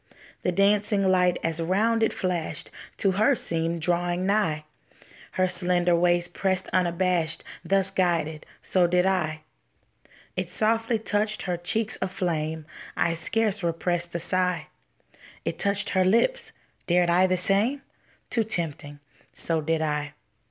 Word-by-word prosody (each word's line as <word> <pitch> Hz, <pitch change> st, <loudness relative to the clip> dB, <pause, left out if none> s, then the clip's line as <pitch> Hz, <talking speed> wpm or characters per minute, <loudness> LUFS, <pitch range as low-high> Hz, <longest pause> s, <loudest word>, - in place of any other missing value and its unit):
The 180 Hz, -, 0 dB
dancing 200 Hz, +1 st, +2 dB
light 180 Hz, -1 st, +3 dB
as 165 Hz, 0 st, 0 dB
round 215 Hz, +7 st, +1 dB
it 225 Hz, -, +3 dB
flashed 175 Hz, -5 st, -3 dB, 0.3 s
To 195 Hz, -, +2 dB
her 215 Hz, +9 st, +3 dB
seemed 165 Hz, -4 st, -1 dB
drawing 175 Hz, +1 st, 0 dB
nigh, 170 Hz, -7 st, +1 dB, 0.7 s
Her 185 Hz, 0 st, +2 dB
slender 180 Hz, -1 st, +2 dB
waist 175 Hz, 0 st, +2 dB
pressed 190 Hz, -1 st, 0 dB
unabashed; 175 Hz, -2 st, 0 dB, 0.2 s
Thus 195 Hz, 0 st, +2 dB
guided, 165 Hz, -4 st, -1 dB, 0.2 s
so 180 Hz, -2 st, +2 dB
did 180 Hz, +1 st, +2 dB
I. 160 Hz, -5 st, 0 dB, 0.9 s
It -, -, -3 dB
softly 225 Hz, +1 st, +1 dB
touched 215 Hz, 0 st, -1 dB
her 180 Hz, -2 st, -1 dB
cheeks 210 Hz, +6 st, -2 dB
aflame. 160 Hz, -4 st, -2 dB, 0.3 s
I 165 Hz, -, +2 dB
scarce 205 Hz, +5 st, 0 dB
repressed 170 Hz, 0 st, 0 dB
a -, -, 0 dB
sigh. 180 Hz, -2 st, 0 dB, 0.8 s
It -, -, -3 dB
touched 200 Hz, +1 st, +1 dB
her 185 Hz, -1 st, +3 dB
lips. 235 Hz, -, +2 dB, 0.4 s
Dared 175 Hz, 0 st, +3 dB
I 180 Hz, +2 st, +4 dB
the 185 Hz, 0 st, +1 dB
same? 210 Hz, +10 st, +1 dB, 0.5 s
Too 230 Hz, -, +2 dB
tempting; 160 Hz, -8 st, -3 dB, 0.4 s
so 165 Hz, -1 st, -1 dB
did 160 Hz, +1 st, 0 dB
I. 150 Hz, -1 st, -2 dB
180 Hz, 135 wpm, -26 LUFS, 170-195 Hz, 0.9 s, I